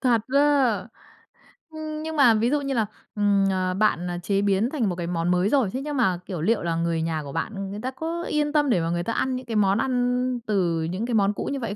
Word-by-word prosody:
Thật 240 -4 +3
á? 280 - +6 1.3
Ưm, 310 -1 -6
nhưng 320 0 -4
mà 265 -6 +6
ví 220 +2 +2
dụ 290 +1 +1
như 275 -1 -2
là, 225 -3 +1 0.3
ừm, 205 -1 +3
ờ, 185 -1 0
bạn, 190 -3 +1
à, 175 - -3
chế 195 +2 +1
biến 200 +4 +2
thành 245 -10 0
một 180 - -2
cái 170 -1 -4
món 170 0 0
mới 180 +2 +2
rồi, 255 -6 +2
thế 260 - -2
nhưng 290 0 -4
mà, 185 -8 +2
kiểu, 180 -6 -5
liệu 220 +6 +1
là 170 -1 -1
người 165 -1 0
nhà 160 -2 -2
của 140 - -8
bạn 195 +5 -4
người 205 - -6
ta 255 +2 -3
có 330 +5 -4
yên 295 -3 -1
tâm 295 -3 +3
để 185 -8 +2
mà 165 - -1
người 175 0 -1
ta 230 - -2
ăn 260 +2 0
những 255 0 -6
cái 230 -2 -4
món 200 -1 +3
ăn 250 0 0
từ 175 -6 +1
những 185 +7 -3
cái 240 - -3
món 205 -2 +3
cũ - - -5
như 275 - -2
vậy 230 -5 -4
215 Hz, 265 wpm, -24 LUFS, 180-260 Hz, 1.3 s, á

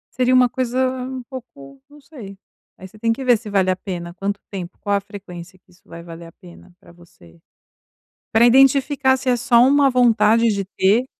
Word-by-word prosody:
seria 255 0 +1
uma 255 0 +5
coisa 250 0 -3 0.3
um 260 -1 -7
pouco, 140 - -13
não 295 - -18
sei. 240 -10 -12 0.4
Aí 190 - -12
você 215 +3 -17
tem 230 +1 0
que 265 - -8
ver 245 -3 +3
se 220 - -11
vale 195 -2 +1
a 185 - -1
pena, 175 -3 -7
quanto 200 +3 -4
tempo, 185 -3 -8
qual 205 - -2
a - - -1
frequência 185 -3 -12
que 180 - -32
isso 180 - -25
vai 170 0 -11
valer 170 0 -11
a 165 - -15
pena 180 0 -17
para - - -19
você. 90 - -21 0.9
Para 225 +2 +5
identificar 265 +1 +3
se 265 - -6
é 245 - +2
só 235 0 +2
uma 280 0 +3
vontade 235 -2 +3
de 200 -2 -2
ter. 200 +5 +1
210 Hz, 205 wpm, -19 LUFS, 185-255 Hz, 0.9 s, uma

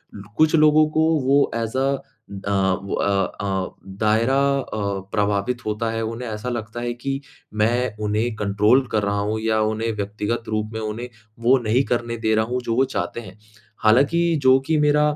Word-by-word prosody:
लो 100 - -9
कुछ 155 +1 +4
लोगों 155 0 +5
को - - +4 0.2
वो 140 +2 +3
एज़ 115 +2 -2
अ, - - +2 0.7
अ, - - 0 0.3
वो 100 - -5
अ 100 -1 +1 0.2
अ, 95 -2 -2 0.3
दायरा 115 +5 +3 0.2
अ, 110 - -5 0.3
प्रभावित 105 +3 -1
होता 110 +2 -1
है, 115 0 -2
उन्हें 115 +2 -4
ऐसा 110 +3 -4
लगता 120 0 -5
है 120 0 -2
कि 135 +3 -4 0.3
मैं 115 +1 +1
उन्हें 110 +3 0
कंट्रोल 105 +5 +2
कर 105 -2 +1
रहा 100 0 0
हूँ 105 +2 -1
या 110 0 +1
उन्हें 110 +1 -1
व्यक्तिगत 105 +3 -3
रूप 110 0 -1
में 110 - -3
उन्हें 110 +3 -5 0.3
वो 130 +3 +5
नहीं 115 +5 +2
करने 120 -1 -2
दे 110 -1 0
रहा 110 0 +2
हूँ 125 +2 -2
जो 115 -1 -2
वो 130 +2 +3
चाहते - - -2
हैं। 105 - -12 0.5
हालाँकि 140 +10 +4 0.2
जो 130 0 +6
कि 160 -1 +2
मेरा, 150 0 +3
115 Hz, 185 wpm, -22 LUFS, 105-125 Hz, 0.7 s, जो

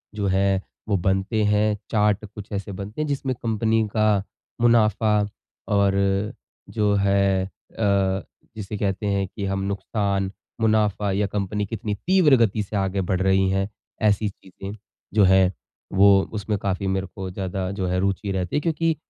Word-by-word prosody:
जो 100 -2 -1
है, 95 0 +2 0.3
वो 100 - +3
बनते 95 +4 0
हैं, 105 0 +2
चार्ट 105 -1 +2
कुछ 105 0 -11
ऐसे 100 0 -4
बनते 100 +8 -5
हैं 155 - -1
जिसमें 135 -2 -2
कंपनी 110 0 +1
का 105 -2 +3 0.4
मुनाफ़ा 110 -2 +3 0.5
और 100 -1 +3 0.8
जो 105 -1 +3
है 100 -1 +2
अ, 95 -1 -1 0.3
जिसे 105 -1 -5
कहते 100 +1 -1
हैं 100 -1 0
कि 100 +1 -6
हम 95 0 -1
नुकसान, 100 -1 -1 0.3
मुनाफ़ा 105 -2 +2
या 100 +1 +1
कंपनी 105 +1 -2
कितनी 105 0 -3
तीव्र 175 - +4
गति 110 -2 +2
से 105 - -7
आगे 95 0 0
बढ़ 95 +1 -1
रही 95 0 +3
है, 95 +1 0 0.3
ऐसी 105 0 +2
चीज़ें 95 +1 -10 0.4
जो 105 - +5
है 95 0 +5 0.4
वो 100 +1 +6 0.3
उसमें 105 0 -2
काफ़ी 95 0 -2
मेरे 95 0 -1
को 95 -1 -5
ज़्यादा 95 0 -3
जो 95 - -1
है 90 +1 0
रुचि 100 +1 -1
रहती 95 +2 -2
है। 150 - +3
क्योंकि 165 0 +1
100 Hz, 160 wpm, -23 LUFS, 95-105 Hz, 0.8 s, वो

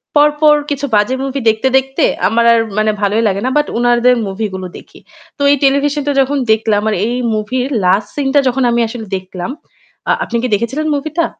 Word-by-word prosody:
পরপর 300 +1 +4
কিছু 285 0 -2
বাজে 210 +5 +2
movie 275 -2 -3
দেখতে, 220 +4 0
দেখতে, 265 +1 -1 0.2
আমার 235 +3 +1
আর 230 - +3 0.2
মানে 215 0 +2
ভালোই 210 +3 +1
লাগে 200 0 -1
না। - - +1
But 295 - +1
উনাদের 240 +1 +3
movie 205 +2 -3
গুলো 185 -1 -5
দেখি। - - -16 0.4
তো - - -9
এই 285 - +3
Television-টা 285 +1 +1
যখন 280 +2 0
দেখলাম 215 -1 +1
আর - - 0
এই 240 - -2 0.2
movie-র 250 +6 -2
last 200 +3 +2
scene-টা 285 0 +1
যখন 255 +1 0
আমি 235 - +1
আসলে 225 -1 -7
দেখলাম 185 +4 -7 0.6
আ - - +4
আপনি 235 - -3
কি - - +1
দেখেছিলেন 265 +9 -3
movieটা? 310 +4 -2
250 Hz, 190 wpm, -15 LUFS, 215-280 Hz, 0.6 s, পরপর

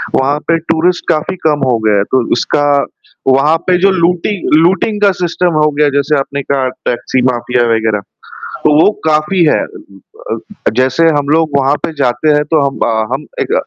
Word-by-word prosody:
वहाँ 140 +3 +1
पे 165 0 +2 0.2
टूरिस्ट 175 +2 0
काफ़ी 155 +5 0
कम 145 -2 0
हो 115 - +2
गए 105 - +3
हैं, 100 - +2
तो 130 -2 +2
उसका 145 +4 0 0.6
वहाँ 135 +5 +3
पे 180 -1 +3
जो 195 - +4
लूटि 175 -1 0 0.2
लूटिंग 190 +6 +2
का 200 -1 +4
सिस्टम 175 0 0
हो 150 - +3
गया 150 +1 +1
है, 145 - +1
जैसे 145 +2 +1
आपने 140 +1 -4
कहा 135 -1 -1 0.2
टैक्सी 125 +1 -1
माफिया 125 -1 0
वग़ैरह, 110 -2 0 0.4
तो 150 - -1
वो 205 - +5 0.2
काफ़ी 155 +4 +2
है। 155 - +2
अ, - - -12
इ - - -15 0.3
अ - - 0
अ, 205 - -5
जैसे 130 +5 +2
हम 140 -1 -3
लोग 160 +1 +2
वहाँ 140 +1 +2
पे - - -2
जाते 125 +3 0
हैं, 150 0 +2
तो 155 0 +1
हम 135 - -4
अ, 115 - 0 0.2
हम 135 +3 -2 0.2
एक - - -2
150 Hz, 200 wpm, -13 LUFS, 130-165 Hz, 0.6 s, वो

